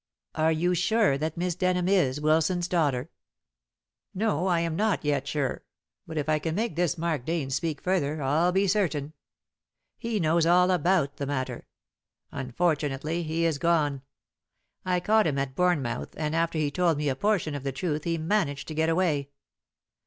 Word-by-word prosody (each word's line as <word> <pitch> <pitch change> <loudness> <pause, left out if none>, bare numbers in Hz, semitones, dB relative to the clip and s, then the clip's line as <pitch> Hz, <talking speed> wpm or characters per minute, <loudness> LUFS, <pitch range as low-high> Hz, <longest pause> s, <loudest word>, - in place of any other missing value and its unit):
"Are 160 +1 +2
you 175 +3 +1
sure 195 -1 +2
that 155 +2 -3
Miss 180 +1 0
Denham 180 0 0
is 170 -9 +2
Wilson's 160 +4 +2
daughter?" 150 -5 0 1.0
"No, 190 -4 0
I 175 -2 +2
am 165 -1 -1
not 205 -3 0
yet 140 -2 0
sure. 140 -2 -2 0.5
But 160 - -6
if 150 - -1
I 155 0 +2
can 160 +1 -3
make 220 -4 -1
this 175 0 0
Mark 160 -5 -1
Dane 155 -2 -2
speak 160 +2 -2
further, 160 -5 0
I'll 150 +6 +2
be 195 +2 +2
certain. 160 -7 0 0.9
He 230 -3 -2
knows 165 0 +2
all 180 +2 +5
about 175 -4 +1
the 140 - -3
matter. 130 -2 -3 0.6
Unfortunately 145 +3 -1
he 165 +1 -1
is 160 -4 0
gone. 150 -5 +1 0.8
I 180 -1 +1
caught 215 +2 +3
him 140 -3 -1
at 135 -1 -2
Bournemouth, 150 -7 0
and 155 0 -2
after 165 0 0
he 150 -2 0
told 170 0 +1
me 150 0 -1
a 135 - +1
portion 200 -3 0
of 145 - -4
the 135 0 -3
truth 150 +2 -2
he 165 -1 -1
managed 160 -4 -1
to - - -4
get 160 +1 +1
away. 160 -5 +1
160 Hz, 175 wpm, -27 LUFS, 145-180 Hz, 1.0 s, all